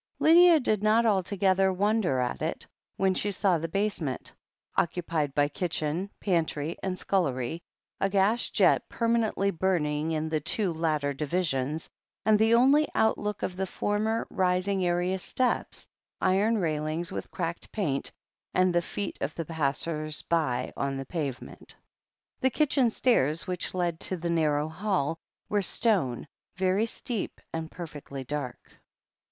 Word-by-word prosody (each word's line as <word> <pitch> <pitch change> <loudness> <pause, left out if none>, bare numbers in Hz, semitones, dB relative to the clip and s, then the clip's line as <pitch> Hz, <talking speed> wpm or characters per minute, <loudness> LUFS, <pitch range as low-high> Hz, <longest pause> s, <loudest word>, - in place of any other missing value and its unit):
Lydia 335 +1 +7
did 215 -6 0
not 220 +2 +4
altogether 190 -1 +2
wonder 195 - +1
at 125 -1 -2
it, - - -3 0.3
when 190 -1 +2
she 205 +2 0
saw 185 -3 +2
the 165 - -3
basement, 180 -7 -2 0.4
occupied 165 -5 0
by 145 0 +3
kitchen, 165 +3 -2
pantry, 165 -4 0
and 185 -1 -2
scullery, 165 -6 -1 0.4
a 195 - +1
gas 200 +4 +2
jet - - +3
permanently 230 -4 +1
burning 160 -4 0
in 155 0 -1
the 160 -1 0
two 175 +5 0
latter 155 -3 0
divi 155 +6 -1
sions 145 0 -2 0.2
— - - -66
and 215 -1 +5
the 225 +1 +5
only 275 +5 +5
outlook 210 -2 +1
of 180 - -2
the 190 +1 -2
former, 215 +4 -1
rising 185 +1 +1
area 180 +2 +1
steps, 250 +6 -1 0.3
iron 200 +5 +2
railings 155 -1 -1
with - - -5
cracked 170 +1 -4
paint, 155 -11 -1 0.4
and 185 -1 +3
the 175 - +3
feet 200 +3 -5
of 150 - -2
the 165 - -3
passers 155 0 -2
by 130 -7 0
on 135 0 -2
the 135 - -5
pavement. 140 -5 -5 0.6
The 260 - +3
kitchen 275 -3 +2
stairs, 165 - +2
which 180 -1 -3
led 175 -2 -1
to 185 - -2
the 170 0 -2
narrow 150 -2 +1
hall, 165 -3 -1 0.3
were 205 -1 +1
stone, 180 - 0 0.3
very 190 +4 +1
steep, 230 -1 -4
and 160 -1 -3
perfectly 145 -6 -7
dark. 135 -2 -4
180 Hz, 145 wpm, -28 LUFS, 155-205 Hz, 0.6 s, Lydia